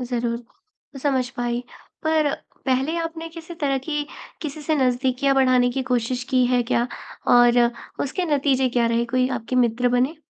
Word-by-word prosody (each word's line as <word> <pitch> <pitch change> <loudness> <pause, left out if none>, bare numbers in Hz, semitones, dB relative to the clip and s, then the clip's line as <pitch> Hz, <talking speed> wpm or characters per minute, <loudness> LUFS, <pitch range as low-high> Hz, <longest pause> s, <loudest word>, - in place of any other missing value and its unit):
ज़रूर, 240 -1 -2 0.6
समझ 260 -4 +1
पाई, 240 0 -1 0.4
पर 315 -2 +2 0.3
पहले 265 +5 +1
आपने 330 0 -4
किसी 330 +1 -10
तरह 280 -4 0
की, 295 +2 -3 0.4
किसी 305 -1 -5
से 315 +1 +1
नज़दीकियाँ 260 +1 +1
बढ़ाने 255 -2 +4
की 265 +2 -2
कोशिश 250 0 -1
की 255 -2 +4
है 245 0 +2
क्या? 235 0 0 0.4
और 240 0 +6 0.5
उसके 320 +7 -2
नतीजे 265 -2 +2
क्या 240 -1 +1
रहे 230 0 +1
कोई 255 +2 +1
आपके 245 +2 -4
मित्र 245 0 +2
बने? 250 +6 +1
255 Hz, 155 wpm, -23 LUFS, 245-285 Hz, 0.6 s, और